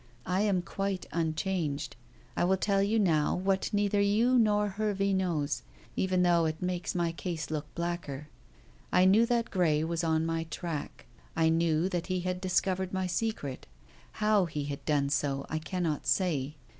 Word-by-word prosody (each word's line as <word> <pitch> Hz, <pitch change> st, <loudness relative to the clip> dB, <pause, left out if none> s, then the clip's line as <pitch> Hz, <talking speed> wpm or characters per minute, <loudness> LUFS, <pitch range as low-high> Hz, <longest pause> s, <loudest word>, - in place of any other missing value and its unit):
I 185 Hz, +2 st, +1 dB
am 195 Hz, -4 st, +1 dB
quite 195 Hz, +1 st, -3 dB
unchanged. 160 Hz, -4 st, -1 dB, 0.4 s
I -, -, +1 dB
will 190 Hz, +2 st, +3 dB
tell 195 Hz, +1 st, +1 dB
you 205 Hz, +3 st, +2 dB
now 165 Hz, -8 st, +2 dB
what 190 Hz, +1 st, 0 dB
neither 205 Hz, 0 st, +2 dB
you 225 Hz, +5 st, +3 dB
nor 210 Hz, -2 st, +3 dB
Hervey 200 Hz, -1 st, 0 dB
knows, 170 Hz, -6 st, 0 dB, 0.3 s
even 185 Hz, -1 st, +1 dB
though 170 Hz, -2 st, +4 dB
it 155 Hz, 0 st, -2 dB
makes 180 Hz, 0 st, -2 dB
my 170 Hz, -1 st, +1 dB
case 165 Hz, -3 st, -4 dB
look 150 Hz, -1 st, -3 dB
blacker. 170 Hz, -5 st, -4 dB, 0.6 s
I 180 Hz, -, +5 dB
knew 215 Hz, +5 st, +5 dB
that 235 Hz, -1 st, 0 dB
Grey 160 Hz, -5 st, +2 dB
was 165 Hz, +1 st, -2 dB
on 160 Hz, -1 st, +1 dB
my 165 Hz, 0 st, -1 dB
track. 160 Hz, -2 st, -5 dB, 0.3 s
I 160 Hz, 0 st, +3 dB
knew 165 Hz, +1 st, +2 dB
that 175 Hz, -2 st, -2 dB
he 185 Hz, -1 st, -1 dB
had 180 Hz, 0 st, -3 dB
discovered 185 Hz, 0 st, 0 dB
my 190 Hz, 0 st, 0 dB
secret. 180 Hz, -, -3 dB, 0.5 s
How 210 Hz, -3 st, +3 dB
he 150 Hz, -3 st, -4 dB
had 140 Hz, -1 st, -5 dB
done 145 Hz, -2 st, +1 dB
so 140 Hz, 0 st, 0 dB
I 155 Hz, -, 0 dB
cannot 160 Hz, -2 st, -2 dB
say. 150 Hz, -6 st, +1 dB
175 Hz, 170 wpm, -30 LUFS, 155-195 Hz, 0.6 s, I